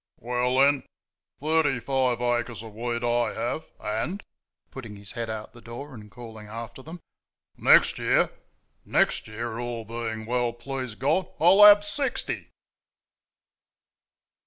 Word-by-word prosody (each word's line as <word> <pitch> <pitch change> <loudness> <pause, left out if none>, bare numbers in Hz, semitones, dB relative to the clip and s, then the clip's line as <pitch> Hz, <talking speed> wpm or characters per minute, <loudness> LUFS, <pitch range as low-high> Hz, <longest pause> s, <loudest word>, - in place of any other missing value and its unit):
"Well, 125 +2 0
then 140 +1 +4 0.6
thirty 150 -3 +2
five 125 -1 0
acres 120 -2 -1
of 110 -2 -10
wheat, 120 +2 -3
I 120 -2 +1
have, 120 +7 -3
and" 115 - -3 0.5
(putting 115 -6 -8
his 100 0 -10
head 115 -2 -4
out 110 -1 -6
the 120 - -14
door 120 +5 -9
and 105 -3 -11
calling 110 0 -11
after 115 +3 -8
them) 160 +5 -10 0.5
"NEXT - - +5
year - - +2 0.5
next - - +1
year, 110 +1 -5
all 120 -2 -4
being 110 -1 -5
well, 120 0 0
please 130 -1 -6
God, 150 +10 +1
I'll 185 +5 +7
have 205 0 +9
SIXTY!" 265 +6 -2
120 Hz, 135 wpm, -26 LUFS, 115-135 Hz, 0.6 s, have